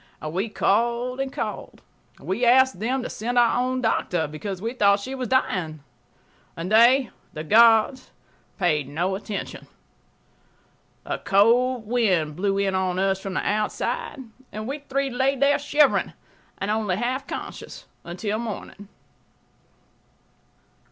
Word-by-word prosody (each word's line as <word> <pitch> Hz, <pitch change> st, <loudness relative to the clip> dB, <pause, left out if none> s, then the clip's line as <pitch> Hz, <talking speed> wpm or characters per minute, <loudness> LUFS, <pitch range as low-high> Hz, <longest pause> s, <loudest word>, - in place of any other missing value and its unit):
We 190 Hz, +8 st, -2 dB
called 235 Hz, +5 st, 0 dB
and 270 Hz, 0 st, -2 dB
called. -, -, -6 dB, 0.4 s
We 195 Hz, +7 st, -3 dB
asked 260 Hz, -3 st, +4 dB
them1to 250 Hz, +4 st, -2 dB
send 240 Hz, +3 st, -3 dB
our 240 Hz, 0 st, +4 dB
own 255 Hz, 0 st, -1 dB
doctor, 180 Hz, -7 st, 0 dB
because 175 Hz, +6 st, -6 dB
we 225 Hz, +5 st, -3 dB
thought 200 Hz, -4 st, +3 dB
she 260 Hz, +7 st, -6 dB
was 260 Hz, -2 st, -4 dB
dying.... 170 Hz, -, -1 dB, 0.7 s
They 230 Hz, +8 st, +4 dB, 0.2 s
[the 155 Hz, -, -5 dB
guards 225 Hz, -, +4 dB, 0.5 s
paid 155 Hz, -7 st, +1 dB
no 175 Hz, +6 st, -1 dB
attention. 200 Hz, +1 st, -6 dB, 1.4 s
A -, -, -3 dB
cold 235 Hz, +4 st, +3 dB
wind 190 Hz, -10 st, +1 dB
blew 195 Hz, +3 st, 0 dB
in 200 Hz, -1 st, 0 dB
on 185 Hz, -1 st, 0 dB
us 195 Hz, 0 st, +1 dB
from 190 Hz, -1 st, -6 dB
the -, -, -1 dB
outside, 210 Hz, +7 st, -2 dB, 0.3 s
and 215 Hz, +1 st, -6 dB
we 280 Hz, +3 st, -4 dB
three 275 Hz, -1 st, -2 dB
lay 265 Hz, +2 st, +1 dB
there 280 Hz, +2 st, +3 dB
shivering 290 Hz, 0 st, +2 dB, 0.4 s
and 200 Hz, +2 st, -2 dB
only 210 Hz, -4 st, 0 dB
half 250 Hz, +6 st, -2 dB
conscious -, -, -7 dB, 0.2 s
until 205 Hz, +5 st, -3 dB
morning. 210 Hz, -3 st, -7 dB
220 Hz, 130 wpm, -24 LUFS, 190-250 Hz, 1.4 s, asked